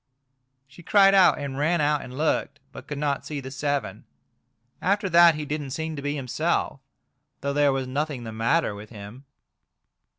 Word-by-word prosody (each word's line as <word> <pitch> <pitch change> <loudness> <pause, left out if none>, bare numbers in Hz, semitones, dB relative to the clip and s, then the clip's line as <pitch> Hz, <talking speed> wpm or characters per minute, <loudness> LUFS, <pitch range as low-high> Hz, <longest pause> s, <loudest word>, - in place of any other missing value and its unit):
She 135 +6 -15
cried 195 +2 +5
out 190 -2 +6
and 140 -1 -5
ran 170 +4 +1
out 150 0 +1
and 125 +1 -9
looked, 155 +1 -1
but - - -11
could 150 - -5
not 145 -1 -1
see 150 -2 -5
the 130 -1 -8
seven. 145 0 -3 0.8
After 200 +2 +1
that 170 -2 +6
he 150 0 -5
didn't 145 -1 -4
seem 160 +3 -4
to 140 - -6
be 145 +1 -2
himself, 130 -4 -1 0.6
though 140 0 -2
there 145 0 +3
was 135 -1 -2
nothing 140 0 -3
the 110 - -6
matter 115 +4 +1
with 105 +1 -10
him.. 110 +5 -11
145 Hz, 175 wpm, -25 LUFS, 130-160 Hz, 0.8 s, out